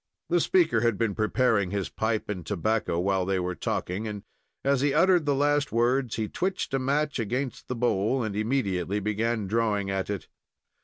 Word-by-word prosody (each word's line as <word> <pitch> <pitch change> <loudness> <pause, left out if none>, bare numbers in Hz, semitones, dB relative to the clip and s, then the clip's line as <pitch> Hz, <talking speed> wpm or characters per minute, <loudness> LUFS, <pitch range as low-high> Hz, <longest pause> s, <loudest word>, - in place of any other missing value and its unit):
The 175 0 +3
speaker 165 -10 +3
had 115 -3 +2
been 115 -3 0
preparing 110 -2 +1
his 100 -1 -2
pipe 110 0 -1
and 95 -4 -4
tobacco 105 0 -1
while 95 +1 +1
they 95 0 0
were 90 0 -2
talking, 95 +4 -3
and, 105 -2 -6 0.4
as 140 -1 +3
he 145 0 +2
uttered 175 -1 +4
the 140 - +3
last 145 +1 +1
words, 120 +1 +1
he 110 -1 -2
twitched 185 - -2
the 135 - +1
match 140 +2 0
against 125 +4 -3
the 125 - -3
bowl, 120 +1 +1
and 105 -2 -3
immediately 105 -5 0
began 110 +1 -1
drawing 105 -1 0
at 95 0 -2
it. 100 -2 -4
110 Hz, 185 wpm, -27 LUFS, 100-135 Hz, 0.4 s, uttered